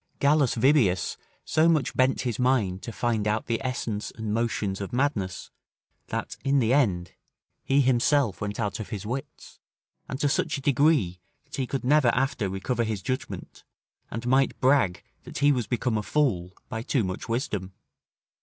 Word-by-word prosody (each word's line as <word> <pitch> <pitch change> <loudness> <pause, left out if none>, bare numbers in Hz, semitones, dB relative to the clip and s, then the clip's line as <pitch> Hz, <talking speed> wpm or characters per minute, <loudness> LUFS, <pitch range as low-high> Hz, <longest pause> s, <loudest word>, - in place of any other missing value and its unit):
Gallus 140 -2 +3
Vibius 115 - +3 0.3
so 160 +1 +3
much 155 -6 +1
bent 130 +1 +2
his 125 -2 -2
mind 115 -8 +1
to 115 - -6
find 110 -2 -1
out 105 +1 0
the 115 +1 -2
essence 115 -5 -3
and 110 -1 -4
motions 105 -4 -1
of 100 - -5
madness, 120 - -1 0.6
that, - - -4
in 140 +1 +2
the 120 -2 +3
end, 95 - +2 0.5
he 140 +1 +3
himself 130 -3 +2
went 105 0 -3
out 105 -2 -2
of 110 - -6
his 105 -1 -5
wits, 130 +5 -6 0.5
and 135 - -4
to 145 - +2
such 140 - 0
a - - -7
degree, 135 - +2 0.2
that - - -9
he 130 -2 -1
could 135 - -3
never 145 0 +4
after 125 -6 0
recover 100 +6 -1
his 110 -4 -3
judgment, 130 -7 -5 0.5
and 115 +2 -5
might 130 +2 +2
brag 130 -9 +3 0.2
that - - -9
he 145 +1 +4
was 125 -6 0
become 120 -2 0
a - - -1
fool 100 -10 0
by 110 - -4
too 120 0 0
much 95 +4 -5
wisdom. 105 -6 -2
120 Hz, 175 wpm, -26 LUFS, 105-135 Hz, 0.6 s, never